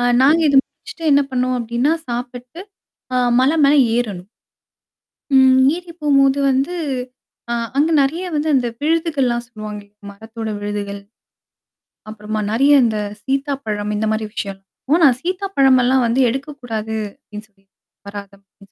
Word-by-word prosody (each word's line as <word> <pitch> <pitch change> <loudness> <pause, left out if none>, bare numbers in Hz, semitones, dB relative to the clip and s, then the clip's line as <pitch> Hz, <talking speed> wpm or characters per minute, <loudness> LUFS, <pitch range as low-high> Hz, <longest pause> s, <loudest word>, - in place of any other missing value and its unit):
ஆ - - 0 0.2
நாங்க 300 +5 +5
இத 280 - +1
முடிச்சுட்டு, 440 -7 -12
என்ன 280 0 +5
பண்ணுவோ 255 0 0
அப்படின்னா, 235 +6 0 0.2
சாப்பிட்டு 245 +5 -6 0.6
அ, - - +2 0.2
மலை 275 +5 +3
மேல 285 - +4 0.2
ஏறணும். 200 -5 -4 1.1
ம், 260 0 +6 0.2
ஏறி 350 -1 -10
போம்போது 275 -1 +3
வந்து, 270 +6 0 0.8
அ, - - 0 0.3
அங்க 310 +3 +3
நெறய 320 +7 0
வந்து, 300 +1 -1
அந்த 255 -2 +2 0.2
விழுதுகள்லாம் 295 -7 0
சொல்லுவாங்க. 215 -3 -8 0.3
மரத்தோட 220 +2 -8
விழுதுகள். 205 -1 -4 1.1
அப்புறமா, 215 0 -5
நெறயா 275 +5 +4
இந்த 220 -2 0 0.2
சீத்தாப்பழம், 265 -7 -2
இந்த 220 +1 -1
மாரி 220 0 -2
விஷயம். 195 -2 -5 0.3
ஓ. - - +2
நான் 255 -4 +5
சீத்தாப்பழமெல்லா 275 -9 +2
வந்து 235 +3 +1
எடுக்கக்கூடாது. 245 -5 -5 0.2
அப்படின்னு 210 +1 -11
சொல்லி 195 -2 -35 0.4
வர்றாத 200 -1 -8
அப்டின்னு 195 0 -23
250 Hz, 130 wpm, -19 LUFS, 215-280 Hz, 1.1 s, ம்